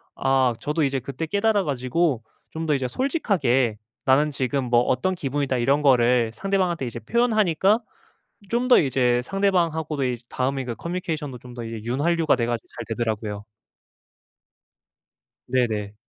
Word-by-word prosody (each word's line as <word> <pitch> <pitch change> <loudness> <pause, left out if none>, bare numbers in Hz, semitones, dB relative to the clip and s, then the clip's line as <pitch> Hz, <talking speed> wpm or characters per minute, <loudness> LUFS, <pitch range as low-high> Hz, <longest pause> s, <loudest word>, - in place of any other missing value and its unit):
아 130 -2 +2
저도 150 +1 -1
이제 135 -1 0
그때 140 +6 -5
깨달아 205 +1 +2
가지고 130 -1 0 0.3
좀 160 0 -5
더 150 - +2
이제 130 -2 -1
솔직하게 135 - +1 0.3
"나는 140 +3 +4
지금 135 -1 -1
뭐 120 0 +4
어떤 130 +10 0
기분이다." 140 -3 -1
이런 135 +5 +2
거를 120 -3 +4
상대방한테 185 -6 0
이제 120 0 -6
표현하니까 215 - +2 0.7
좀 245 +2 0
더 250 - +7
이제 125 -4 +2
상대방하고도 165 -5 0
이제 125 -1 -2
다음에 135 +1 -1
이게 120 -2 -4
커뮤니케이션도 165 - -4
좀 125 0 -12
더 120 - -6
이제 115 -1 -6
윤활유가 155 +6 +1
돼 115 - 0
가지고 120 -1 -3
잘 115 - -5
되더라고요. 110 -3 -3 2.0
네네. 110 -5 -1
135 Hz, 345 characters per minute, -24 LUFS, 120-170 Hz, 2.0 s, 더